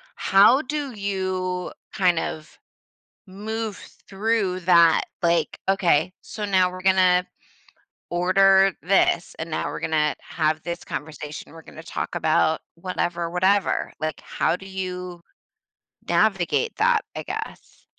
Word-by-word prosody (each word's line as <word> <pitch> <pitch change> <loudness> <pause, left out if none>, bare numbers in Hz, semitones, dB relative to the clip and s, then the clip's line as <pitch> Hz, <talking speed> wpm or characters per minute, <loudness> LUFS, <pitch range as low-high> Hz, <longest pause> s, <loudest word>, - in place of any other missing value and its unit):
How 205 +8 +5
do 285 -2 -4
you 185 -3 -3 0.2
kind 180 -4 +2
of 155 -1 -6 0.7
move 215 +2 -5 0.3
through 195 -2 0
that? 170 -2 +5 0.2
Like, 170 0 +1
"Okay. 180 -3 +2
So, 210 - -6
now 190 -3 +3
we're 185 0 -9
gonna 185 -1 +4 0.9
order 190 +2 +4
this, 180 -1 +2
and 160 +1 -5
now 155 - -2
we're - - -6
gonna 155 -1 +1
have 155 -1 -1
this 170 0 -5
conversation, 150 0 -7
we're 165 0 -12
gonna 160 - -12
talk - - -5
about 160 -1 +2
whatever, 170 -1 -3
whatever." 190 +3 +1
Like, 155 -1 -3
how 175 - 0
do 190 - -12
you 180 -2 -6 0.9
navigate 215 - +1
that, 450 -1 +3
I - - -4
guess? - - -8
185 Hz, 125 wpm, -23 LUFS, 170-195 Hz, 0.9 s, How